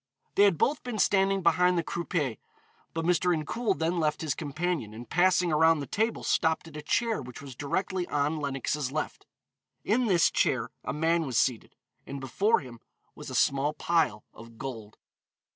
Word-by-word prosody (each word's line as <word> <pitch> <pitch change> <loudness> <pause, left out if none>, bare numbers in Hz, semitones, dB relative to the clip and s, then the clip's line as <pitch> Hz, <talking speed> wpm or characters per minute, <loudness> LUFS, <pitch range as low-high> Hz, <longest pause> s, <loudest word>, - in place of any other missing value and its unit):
They 205 - +5
had 195 -5 +3
both 285 - +1
been 245 -3 -5
standing 195 -1 +2
behind 180 +2 +4
the 170 - +1
croupier, 160 - -2 0.6
but 165 0 -2
Mr. 180 0 +2
Incoul 200 +7 -1
then 170 +2 0
left 155 -2 0
his 155 -4 -1
companion, 150 -6 -3
and 120 +1 -9
passing 180 +3 +3
around 160 +1 +4
the 140 - -4
table 220 - -1
stopped 160 0 +1
at 155 - -12
a 150 - -5
chair 225 +8 0
which 125 -1 -9
was 135 -3 -10
directly 180 +6 -2
on 145 +2 0
Lenox's 140 -1 -2
left. 155 +1 -4 0.6
In 235 +4 +1
this 175 -6 +4
chair - - +1
a - - -3
man 165 +1 +1
was 125 - -1
seated, 125 -4 0 0.3
and 140 - -5
before 195 - +1
him 125 -4 -11 0.3
was - - -9
a - - -5
small 140 +2 +2
pile 155 -11 0
of 115 0 -14
gold. 110 -5 -7
160 Hz, 175 wpm, -28 LUFS, 140-180 Hz, 0.6 s, They